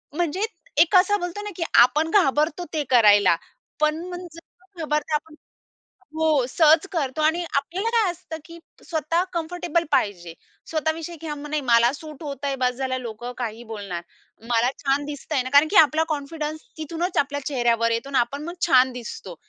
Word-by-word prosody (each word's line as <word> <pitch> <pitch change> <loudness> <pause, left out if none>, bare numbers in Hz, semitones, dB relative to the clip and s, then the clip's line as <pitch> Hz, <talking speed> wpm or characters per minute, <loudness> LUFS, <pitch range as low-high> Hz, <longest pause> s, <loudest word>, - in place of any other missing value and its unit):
म्हणजे 350 +5 0 0.4
एक 345 +4 +3
असा 410 +3 +5
बोलतो 355 +2 -5
ना, 415 - -5
की 335 - -2
आपण 290 +7 +5
घाबरतो 335 -2 +2
ते 305 - 0
करायला, 205 -7 +6 0.4
पण 305 +2 +1
मग 355 0 -7
जर 335 - -10 0.4
न - - -11
घाबरते 300 0 -1
आपण 305 +1 -3 0.8
हो, 315 -5 +2
सहज 315 +4 +4
करतो 290 -3 -2
आणि 325 +3 +2
आपल्याला 350 +10 -1
काय 450 -5 +2
असतं 345 -2 -8
की 335 0 -12 0.3
स्वतः 330 +1 0
कम्फर्टेबल 340 0 -1
पाहिजे. 180 -10 0 0.4
स्वतः 315 0 0
विषयी 330 +1 -7
की 325 - -8
हं, 295 -1 -5
नाही 305 0 0
मला 235 +1 +5
सूट 305 +1 -10
होतं 285 -2 -5
आहे 275 -1 -1
बस 250 -1 0
झालं, 260 0 -2
लोकं 240 +1 -6
काहीही 235 -1 -5
बोलणार. 200 -6 -6 0.5
मला 240 +2 +3
छान 280 +1 0
दिसतं 295 +1 -6
आहे 265 - +2
ना 255 - -5
कारण 290 +2 +6
की 410 - 0
आपला 315 +1 +6
कॉन्फिडन्स 305 +1 -4 0.2
तिथूनच 335 +3 -3
आपल्या 285 0 0
चेहऱ्यावर 235 -4 +1
येतो 230 +4 -2
आणि 270 -2 +1
आपण 260 +4 -1
मग 345 +2 -6
छान 260 -4 +5
दिसतो. 230 -7 -8
300 Hz, 180 wpm, -23 LUFS, 255-330 Hz, 0.8 s, करायला